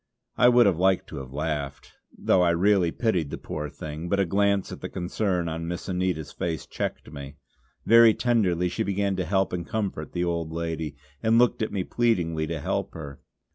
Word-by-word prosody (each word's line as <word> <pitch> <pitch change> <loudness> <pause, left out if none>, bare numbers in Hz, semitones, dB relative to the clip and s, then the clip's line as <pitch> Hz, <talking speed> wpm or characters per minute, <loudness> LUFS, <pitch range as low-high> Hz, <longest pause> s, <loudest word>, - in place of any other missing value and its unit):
I 125 - +6
would 120 0 +6
have 95 -5 +2
liked 95 0 +3
to - - -7
have 65 -2 -7
laughed, 70 -2 -4 0.3
though 90 - +3
I 90 - +4
really 90 +1 +3
pitied 90 -10 0
the - - -5
poor 75 -1 -5
thing; 75 +4 -7
but 100 - +1
a 100 - +3
glance 100 +2 +1
at - - -8
the - - -5
concern 90 -1 -1
on 80 +1 -4
Miss 85 0 -5
Anita's 90 -4 -2
face 80 -4 -3
checked - - -5
me. 70 -1 -8 0.5
Very 115 0 +7
tenderly 95 -8 +1
she 90 - -3
began 100 0 0
to 90 - -1
help 95 +2 +1
and 90 -1 -2
comfort 95 -5 -4
the 90 - -1
old 85 -2 -2
lady, 80 -3 -3 0.3
and 110 +1 +3
looked 120 -1 +3
at 110 - -1
me 95 -3 -1
pleadingly 85 -10 0
to 80 0 -3
help - - -2
her. 70 -4 -8
90 Hz, 200 wpm, -26 LUFS, 80-100 Hz, 0.5 s, Very